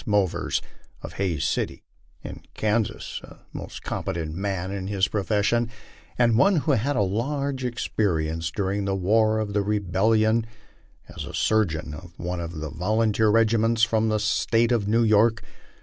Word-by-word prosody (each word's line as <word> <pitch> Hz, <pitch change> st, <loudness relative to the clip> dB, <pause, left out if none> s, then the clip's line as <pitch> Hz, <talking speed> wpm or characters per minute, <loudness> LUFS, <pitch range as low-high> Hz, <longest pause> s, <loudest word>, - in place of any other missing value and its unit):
Movers, 100 Hz, -4 st, +1 dB, 0.4 s
of -, -, -7 dB
Hays 85 Hz, -7 st, 0 dB
City, -, -, -2 dB, 0.7 s
Kansas, 110 Hz, +1 st, -1 dB
a -, -, -13 dB, 0.2 s
most -, -, -8 dB
competent 80 Hz, -2 st, -3 dB
man 95 Hz, 0 st, -3 dB
in 95 Hz, -1 st, -4 dB
his 100 Hz, -1 st, +1 dB
profession, 105 Hz, +3 st, 0 dB, 0.5 s
and 115 Hz, -2 st, +3 dB
one 195 Hz, +5 st, +5 dB
who 155 Hz, -1 st, +1 dB
had 125 Hz, -7 st, +2 dB
had 140 Hz, +4 st, 0 dB
a 105 Hz, -, +3 dB
large 135 Hz, +7 st, -2 dB
experience 85 Hz, -9 st, -1 dB
during 100 Hz, +2 st, -2 dB
the 95 Hz, 0 st, 0 dB
war 110 Hz, +3 st, +2 dB
of 105 Hz, -2 st, -2 dB
the 105 Hz, -, +2 dB
rebellion 110 Hz, +3 st, +2 dB, 0.6 s
as -, -, -9 dB, 0.2 s
surgeon 85 Hz, -9 st, +1 dB
of 85 Hz, +3 st, -11 dB
one 90 Hz, 0 st, -4 dB
of 85 Hz, 0 st, -5 dB
the 80 Hz, -, -5 dB
volunteer 110 Hz, +5 st, +1 dB
regiments 115 Hz, +1 st, +3 dB
from 110 Hz, -1 st, +3 dB
the 110 Hz, -, +1 dB
State 115 Hz, +2 st, +1 dB
of 110 Hz, -4 st, +1 dB
New 115 Hz, +2 st, +3 dB
York. 110 Hz, +1 st, +3 dB
105 Hz, 150 wpm, -25 LUFS, 95-115 Hz, 0.7 s, one